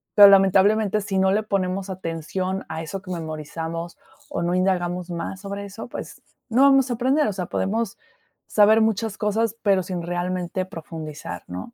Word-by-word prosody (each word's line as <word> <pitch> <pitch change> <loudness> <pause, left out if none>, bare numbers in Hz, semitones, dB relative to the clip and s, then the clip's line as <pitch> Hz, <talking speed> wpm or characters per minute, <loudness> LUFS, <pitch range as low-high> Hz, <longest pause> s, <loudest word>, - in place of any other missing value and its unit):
pero, 205 -1 +10
lamentablemente, 200 +2 +4
si 195 -1 -1
no 190 0 +3
le 210 +2 +1
ponemos 195 -1 -1
atención 185 +2 -3
a 160 0 -4
eso 185 +4 -6
que 185 - -8
memorizamos 165 +1 -5 0.3
o 285 - -3
no 175 +1 0
indagamos 180 -1 0
más 170 +3 -5
sobre 200 0 -5
eso, 200 +4 -8
pues, - - -8 0.3
no 245 +4 +4
vamos 270 -2 +5
a - - 0
aprender, 265 +5 +2
o 210 - -1
sea, 185 -2 -3
podemos 220 +1 -1 0.5
saber 215 +1 +5
muchas 220 -1 0
cosas, 220 +1 0
pero 195 -2 +3
sin 180 -1 -4
realmente 175 +1 -2
profundizar, 155 - -7
¿no? 90 - -7
190 Hz, 170 wpm, -23 LUFS, 175-210 Hz, 0.5 s, pero